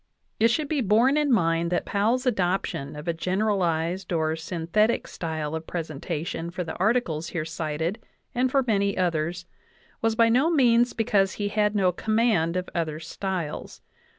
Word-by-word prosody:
It 225 - +6
should 295 +5 0
be 290 -2 0
borne 230 +6 +4
in 300 -2 +2
mind 170 -5 +2
that 175 - 0
Powell's 230 +6 +1
adoption 180 - -1
of 150 +3 -8
a 170 - +1
gen 180 +3 -2
eralized 180 -3 0
or 160 0 0
synthetic 170 +7 0
style 160 -2 -4
of 160 0 -5
presentation 165 0 -4
for 180 +1 -4
the 160 - -5
articles 185 -6 +1
here 155 -2 -3
cited 160 +4 -3 0.3
and 255 +1 +1
for 270 +1 +2
many 200 -3 +1
others 175 -1 -1 0.6
was 225 0 +1
by 230 0 +5
no 255 +8 +3
means 245 -6 +4
because 200 -4 +2
he 205 -1 -2
had 210 0 +1
no 190 -3 +3
command 215 -4 +1
of 180 - -3
other 155 -2 -2
styles. 170 -1 -5
185 Hz, 165 wpm, -25 LUFS, 165-225 Hz, 0.6 s, It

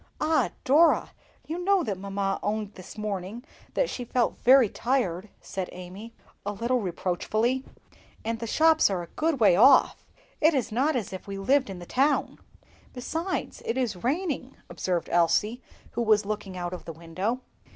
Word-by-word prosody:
"Ah! 310 +1 +2
Dora, 310 +6 +4 0.3
you 340 +3 -4
know 390 -1 +3
that 205 -4 -2
mamma 195 0 -2
owned 210 0 -2
this 185 +2 -11
morning 210 +2 -4 0.3
that - - +2
she 250 - -5
felt 240 0 0
very 255 -1 +6
tired," 215 -5 -1
said 190 -2 -5
Amy, 185 +6 -10 0.3
a 205 - -3
little 235 +4 0
reproachfully; 215 +7 -1 0.6
"and 225 0 -2
the 230 - -4
shops 315 +4 +4
are 185 -3 -2
a - - -10
good 315 -3 0
way 205 -6 +6
off; 260 +8 +5 0.4
it 315 0 +5
is 255 -5 -1
not 270 +7 +1
as 220 -6 -3
if 190 - -8
we 200 0 -5
lived 260 +5 +2
in 190 - -6
the 175 - -9
town." 270 +6 +1 0.5
"Besides, 325 +9 -3
it 230 - -2
is 220 -9 -2
raining," 275 -1 -2
observed 180 -3 -2
Elsie, 175 +8 +2 0.3
who - - -2
was 215 -3 +3
looking 205 -3 -4
out 175 0 -4
of 180 - -8
the 165 - -6
window. 185 +10 -3
225 Hz, 170 wpm, -27 LUFS, 195-265 Hz, 0.6 s, very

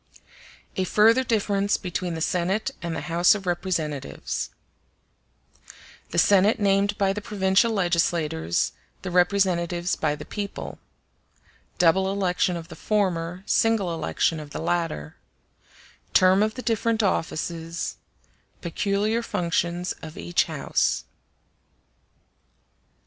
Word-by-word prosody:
A 190 - +2
Further 225 +7 +4
Difference 205 -4 +1
Between 180 -2 -3
The 160 - -5
Senate 180 +6 0
And 170 -1 -3
The - - -3
House 175 +3 +4
Of 195 -2 -6
Representatives 170 -5 -2 1.6
The - - -4
Senate 205 +3 +4
named 200 0 +2
by 195 -1 +2
the 210 - -5
provincial 195 +2 +2
legislators, 170 - +1 0.3
the 185 - -4
Representatives 175 -1 +2
by 150 -2 0
the - - -9
people—Double 190 -2 -3
election 180 -2 0
of 165 0 -9
the - - -9
former; 180 -4 -1
single 215 -6 +2
election 165 0 0
of 150 -1 -9
the - - -6
latter—Term 170 - -1
of 215 +1 +1
the 255 - -6
different 225 -1 +1
offices—Peculiar 175 +4 -3
functions 175 -4 -1
of 155 -1 -9
each 85 +1 +1
House. - - 0
185 Hz, 105 wpm, -25 LUFS, 170-200 Hz, 1.6 s, Further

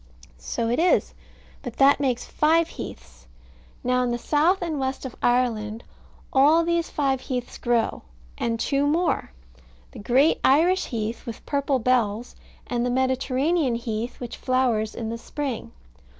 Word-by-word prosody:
So 60 - -3
it 240 +5 0
is: 350 +2 +2 0.5
but 245 -4 -7
that 275 +1 +5
makes 255 -3 0
five 320 +2 +2
heaths. - - -10 0.6
Now 250 0 +2
in 250 - 0
the 240 - -1
south 320 +9 +2
and 320 -4 -2
west 265 0 -3
of 255 - -6
Ireland 230 -3 0 0.5
all 300 +5 +5
these 340 0 0
five 270 -3 0
heaths 250 -2 -4
grow, 240 -2 0 0.3
and 230 -1 -2
two 280 +3 +1
more: 330 - 0 0.6
the - - -10
great 260 +9 +3
Irish 345 +7 +4
heath, 225 -1 -4
with 230 - -7
purple 280 -1 0
bells, 235 -2 0 0.3
and 240 -1 -1
the 245 - 0
Mediterranean 260 +3 +1
heath, 230 0 -4
which 245 -2 -6
flowers 245 -4 0
in 230 -1 -4
spring. 270 -1 -5
255 Hz, 145 wpm, -24 LUFS, 235-290 Hz, 0.6 s, that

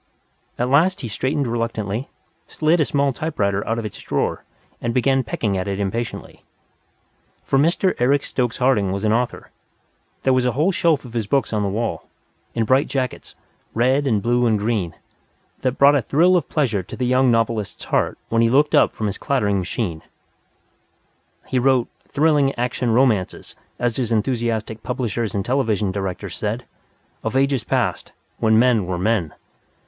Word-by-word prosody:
At 120 - 0
last 165 +9 +3
he 120 - -4
straightened 135 +6 -1
reluctantly, 115 0 -2 0.4
slid 160 +2 +1
a - - +3
small 140 -1 +1
typewriter 100 -10 -1
out 115 - 0
of 115 - -3
its 105 - -7
drawer, - - -2 0.4
and 115 0 -2
began 135 +1 +2
pecking 110 -3 -2
at 90 - -3
it 100 0 -2
impatiently. 110 +4 -4 1.0
For 135 - +1
Mr. 170 +5 +2
Eric 135 +3 +3
Stokes 125 -3 -2
Harding 120 -7 +2
was 100 +1 -3
an 110 0 +2
author. 120 +1 -2 0.7
There 130 - +3
was 130 -1 +2
a 125 -1 +1
whole 155 - +2
shelf 165 -6 +1
of 120 - -11
his 115 -4 -2
books 135 0 0
on 105 - +1
the 100 - 0
wall, 115 +4 -3 0.5
in 115 -1 +1
bright 130 +5 +3
jackets, 130 -3 -4 0.4
red 130 +5 +2
and 105 -6 +1
blue 120 +1 +2
and 110 -2 +2
green, 105 -5 -1 0.7
that 130 - +1
brought 140 +1 +6
a 145 - +3
thrill 170 +10 +3
of 175 - 0
pleasure 120 -10 0
to 90 - -9
the 125 - -1
young 130 +1 +3
novelist's 115 -3 0
heart - - 0
when 115 0 +2
he 115 - +4
looked 145 +4 +3
up - - +4
from 110 - -4
his 100 -2 -3
clattering 105 -8 +1
machine. 90 -3 -3 1.4
He 130 - 0
wrote 130 -1 +2 0.2
"thrilling 145 -2 +2
action 125 0 -1
romances," 115 -5 +1 0.2
as 120 -2 -1
his 120 -3 -1
enthusiastic 115 -1 -1
publishers 115 -3 -2
and 100 0 -1
television 110 -7 0
directors 95 -2 -4
said, - - -3 0.6
"of 115 +3 -1
ages 135 -3 +1
past, - - -1 0.3
when 110 0 +3
men 115 -5 +3
were 90 -1 -2
men. 95 -4 0
120 Hz, 170 wpm, -21 LUFS, 110-135 Hz, 1.4 s, brought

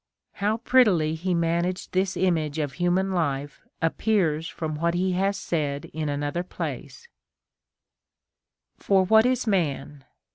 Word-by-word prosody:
f - - -21
How 210 +2 +1
prettily 210 -11 +3
he 175 +3 -1
managed 170 +2 -1
this 185 0 0
image 160 -5 0
of 145 -3 -2
human 180 +3 +1
life 145 -5 -2 0.2
appears 165 -3 +1
from 155 -1 -4
what 170 +2 0
he 185 +1 +1
hath 195 +2 +1
said 145 -7 -3
in 155 -1 -2
another 145 +4 -2
place: 325 - -7 0.9
— - - -60
For 190 -1 +3
what 220 +4 +5
is 255 -1 0
man 145 - -1
175 Hz, 140 wpm, -25 LUFS, 155-190 Hz, 0.9 s, what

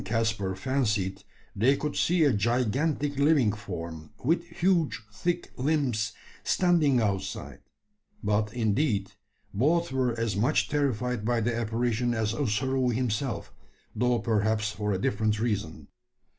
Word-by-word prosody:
Karl - - -10
and 115 - +2
Caspar 100 -4 -1
fancied 100 -5 -1 0.3
they 130 +7 +3
could 150 -1 -3
see 175 -1 +3
a 145 -4 +4
gigantic 130 +7 0
living 140 -6 +4
form, 85 -6 -7 0.2
with 165 +4 +2
huge 175 -4 +1
thick 175 +10 -2
limbs, 125 -7 0 0.3
standing 165 -8 +3
outside; 100 -4 -2 0.6
but, 105 0 +1
indeed, 110 -2 0 0.4
both 155 +9 +2
were 125 -3 0
as 115 -4 0
much 120 +10 +2
terrified 125 -5 0
by 120 +1 +1
the 115 +1 0
apparition 120 +1 0
as 110 -1 0
Ossaroo 130 +1 0
himself, 120 -2 -2 0.4
though 125 0 +2
perhaps 110 -1 +1
for 105 0 -2
a 95 - +1
different 105 +2 0
reason. 100 -10 -2
115 Hz, 130 wpm, -28 LUFS, 105-135 Hz, 0.6 s, a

